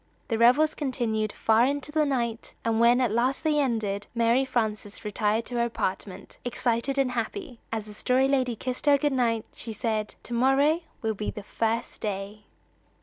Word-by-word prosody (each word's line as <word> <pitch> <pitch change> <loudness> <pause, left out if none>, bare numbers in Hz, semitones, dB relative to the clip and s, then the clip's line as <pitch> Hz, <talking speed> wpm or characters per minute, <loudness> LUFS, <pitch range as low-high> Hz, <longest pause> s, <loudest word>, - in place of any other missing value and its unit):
The 225 -2 0
revels 265 +7 +5
continued 230 -7 -1
far 225 +3 +3
into 285 +1 -2
the 305 -1 +2
night; 235 -4 -2
and 225 -1 +1
when 235 +2 +5
at 245 -4 +2
last 245 +4 +1
they 305 -2 +2
ended, 220 -7 -1
Mary 235 +3 +3
Frances 215 -5 -2
retired 210 +2 0
to 245 - -4
her 235 - +2
apartment, 195 -4 -4
excited 245 +2 -1
and 270 -2 +2
happy. 250 - -4
As 220 -2 -3
the 210 - -10
Story 255 +5 +2
Lady 260 -3 +1
kissed 255 +5 -4
her 285 -1 +7
good 290 0 0
night, 230 -4 +1
she 225 - -5
said: 215 -1 -2
"To 240 - -6
morrow 270 +7 +3 0.2
will 220 0 +1
be 210 0 -4
the 210 - -7
first 225 +2 -2
day." 205 0 -4
235 Hz, 180 wpm, -27 LUFS, 220-265 Hz, 0.2 s, her